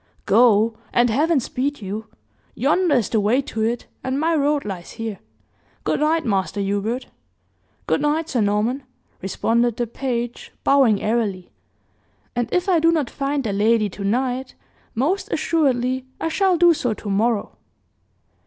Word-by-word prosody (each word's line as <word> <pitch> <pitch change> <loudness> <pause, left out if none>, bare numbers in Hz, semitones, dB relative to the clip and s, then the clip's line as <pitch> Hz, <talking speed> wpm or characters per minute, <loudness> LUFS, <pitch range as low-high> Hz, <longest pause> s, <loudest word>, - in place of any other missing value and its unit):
"Go, 225 0 +4 0.2
and 240 -1 +3
Heaven 305 +5 +2
speed 270 +4 -2
you! 210 +1 -5 0.5
Yonder 300 +5 +2
is 235 -6 +1
the 225 - +2
way 215 +6 +2
to 225 - -4
it, 230 +2 -1 0.2
and 260 +1 -1
my 325 +2 +2
road 290 -1 +1
lies 185 -4 -6
here. 225 -4 -5 0.6
Good - - 0
night, 315 +1 +1
master 195 -3 0
Hubert." 205 +5 -1 0.8
"Good - - +1
night, 300 +2 +1
Sir 245 -7 0
Norman," 210 +6 +1 0.4
responded 230 +5 0
the 240 - 0
page, 240 0 -4
bowing 265 -7 +4
airily; 210 -5 -1 0.8
"and 240 -1 -1
if 360 +1 +1
I 360 -3 +4
do 330 +1 +4
not 305 -6 0
find 275 0 -1
the 210 -4 -2
lady 215 +1 +2
to 200 +2 -8
night, 250 +5 -1 0.4
most 310 - 0
assuredly 260 -5 +1
I 325 - -1
shall 375 +1 +2
do 345 0 +6
so 245 -7 -1
to 210 - -10
morrow." 210 +2 0
240 Hz, 155 wpm, -22 LUFS, 215-285 Hz, 0.8 s, do